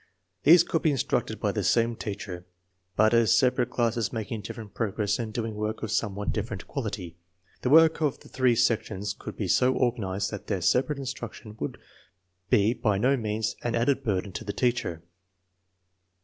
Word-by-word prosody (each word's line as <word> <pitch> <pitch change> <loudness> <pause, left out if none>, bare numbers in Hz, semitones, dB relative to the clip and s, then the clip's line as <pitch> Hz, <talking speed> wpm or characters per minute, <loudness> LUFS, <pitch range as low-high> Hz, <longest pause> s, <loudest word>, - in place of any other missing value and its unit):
These 165 +3 +7
could 170 -2 -1
be 160 - +3
instructed 140 -4 -1
by - - 0
the - - -2
same 115 0 +2
teacher, 100 -5 -6 0.5
but 110 +1 +4
as 115 -2 +4
sepa* 130 -1 +3
rate 125 - +1
classes 115 -1 0
making 110 -1 -4
different 105 0 -8
progress 105 -1 -1
and 115 -2 -3
doing 115 0 -3
work 105 +1 -3
of 110 - -3
somewhat 105 -2 -1
different 110 -2 -4
quality. 105 - -5 0.4
The 125 - 0
work 160 +2 +6
of 150 -4 0
the - - -15
three 130 -2 +2
sections 110 -4 0
could - - -9
be - - -2
so 130 +1 +3
organized 105 -6 -1
that 105 - -7
their 95 - -1
separate 130 - +2
instruction 120 -5 -7
would 70 - -4 0.7
be 105 +3 +4
by 105 -5 0
no 130 +7 +3
means 110 -2 -2
an 120 -1 -1
added 135 +4 +1
burden 100 -4 -1
to 105 - -6
the 100 -2 -4
teacher. 120 -9 -1
110 Hz, 175 wpm, -27 LUFS, 105-125 Hz, 0.7 s, These